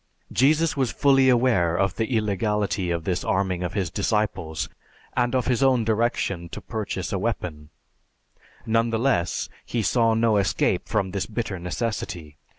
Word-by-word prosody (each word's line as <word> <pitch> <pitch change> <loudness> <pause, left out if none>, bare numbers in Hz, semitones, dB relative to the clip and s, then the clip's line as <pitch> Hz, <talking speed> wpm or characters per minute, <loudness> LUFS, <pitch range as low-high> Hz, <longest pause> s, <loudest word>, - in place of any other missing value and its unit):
Jesus 155 +5 +3
was 130 -4 0
fully 135 -2 +4
aware 115 -10 +3
of 95 -1 +1
the 115 +1 0
illegality 105 -2 0
of 85 -1 -1
this 90 +1 -1
arming 95 -2 0
of 90 -1 -3
his 95 -5 -1
disciples 95 -6 -1 0.5
and 120 +1 +1
of 125 -2 +1
his 125 +1 +1
own 130 -3 +4
direction 105 -6 0
to - - -7
purchase 100 -5 -4
a 100 - 0
weapon; 90 -9 -3 1.0
none 115 +1 +2
the 115 - 0
less, 110 -9 0 0.2
he 115 -2 -2
saw 115 0 +3
no 115 -1 +3
escape 100 -2 +1
from 100 -3 0
this 100 -1 -2
bitter 105 -4 -3
necessity. 90 -5 -4
105 Hz, 155 wpm, -24 LUFS, 90-120 Hz, 1.0 s, fully